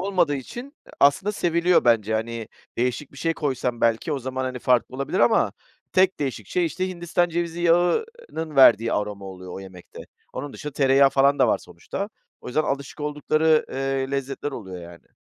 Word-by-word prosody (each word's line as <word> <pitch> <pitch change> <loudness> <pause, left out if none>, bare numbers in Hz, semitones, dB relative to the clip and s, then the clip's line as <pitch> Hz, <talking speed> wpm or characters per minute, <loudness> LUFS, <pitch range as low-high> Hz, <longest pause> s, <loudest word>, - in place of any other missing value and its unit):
olmadığı 180 -6 +1
için 245 - -8 0.3
aslında 165 +9 +4
seviliyor 175 -2 +2
bence, 110 -3 +3
hani, 115 0 -3 0.3
değişik 125 +4 -1
bir 140 - -12
şey 165 -1 0
koysam 130 -5 -2
belki 115 +6 +1
o 140 - -1
zaman, 130 +1 -4
hani, 130 -1 -4
farklı 125 0 +1
olabilir 140 +7 -2
ama 225 - +3 0.4
tek 185 0 +3
değişik 125 -8 -3
şey, 180 - 0
işte, 185 +3 -2
Hindistan 175 0 0
cevizi 170 0 -3
yağının 175 - 0
verdiği 115 -3 +6
aroma 105 -1 -3
oluyor 95 -1 -9
o 95 - -7
yemekte. 95 -2 -11 0.3
Onun 140 +2 -6
dışında 150 -1 -7
tereyağı 135 0 +4
falan 140 +1 +3
da - - +4
var - - +2
sonuçta. 200 +1 -6 0.3
O - - -12
yüzden, 155 +5 +1
alışık 140 0 -4
oldukları, 155 +1 +2
eee, 135 0 -2
lezzetler 140 +1 -3
oluyor 95 -9 -8
yani. 85 0 -13
140 Hz, 175 wpm, -24 LUFS, 120-170 Hz, 0.4 s, verdiği